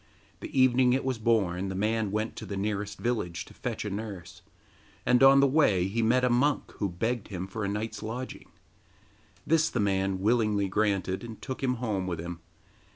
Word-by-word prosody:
The - - -3
evening 130 -1 +5
it 130 - 0
was 130 -3 -1
born 100 -5 +1
the 95 - -4
man 110 +2 0
went 110 +3 -2
to - - -7
the 100 - -4
nearest 105 0 -2
village 95 -8 -2
to - - -15
fetch 115 -3 -4
a - - -2
nurse, 100 -4 -7 0.6
and 125 0 +4
on 135 +1 +8
the 140 - +5
way 130 - +3
he 115 +4 -1
met 120 +3 +3
a 125 - +3
monk 140 +4 +1
who 100 - -1
begged 115 +6 -2
him 95 -2 -5
for 105 +3 -5
a - - 0
night's 105 +2 -4
lodging. 120 +4 -6 1.0
This 160 0 +3
the 120 - -2
man 95 -2 +1
willingly 105 -1 +2
granted, 100 -1 0
and 115 -2 -8
took 130 -1 -6
him 130 -2 +1
home 105 -6 -2
with 85 -3 -3
him. 85 0 -6
110 Hz, 195 wpm, -28 LUFS, 95-125 Hz, 1.0 s, on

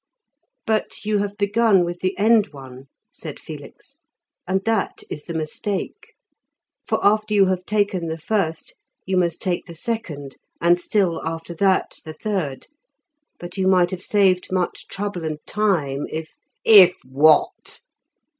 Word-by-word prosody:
"But 220 -1 -1
you 210 -1 +1
have 205 0 -3
begun 205 -2 +3
with 175 0 -5
the 185 +1 -2
end 220 0 +4
one," 130 -1 -11 0.3
said - - -8
Felix, - - -11 0.5
"and 190 +1 0
that 225 -3 -1
is 150 - -6
the 170 - -6
mistake. 185 - -4 0.7
For - - +1
after 215 +1 +3
you 200 -1 +6
have 185 -1 -2
taken 205 -5 0
the 160 0 -3
first 165 -2 -2 0.3
you 190 - -1
must 175 -2 0
take 180 -2 -2
the 170 - -10
second, 160 - -5 0.2
and 175 +1 +4
still 185 -4 0
after 165 +1 -4
that 190 +2 +1
the 155 - -8
third. 155 -7 -3 0.7
But 175 +2 -9
you 190 - +2
might 180 -2 +4
have 185 -1 -5
saved 190 -3 +2
much 185 -1 -2
trouble 200 -3 -4
and 155 -1 -3
time 160 -10 0
if 160 0 -6 0.2
" - - -47 0.2
"If 180 - -5
what?" 145 +4 +2
185 Hz, 150 wpm, -22 LUFS, 160-205 Hz, 0.7 s, you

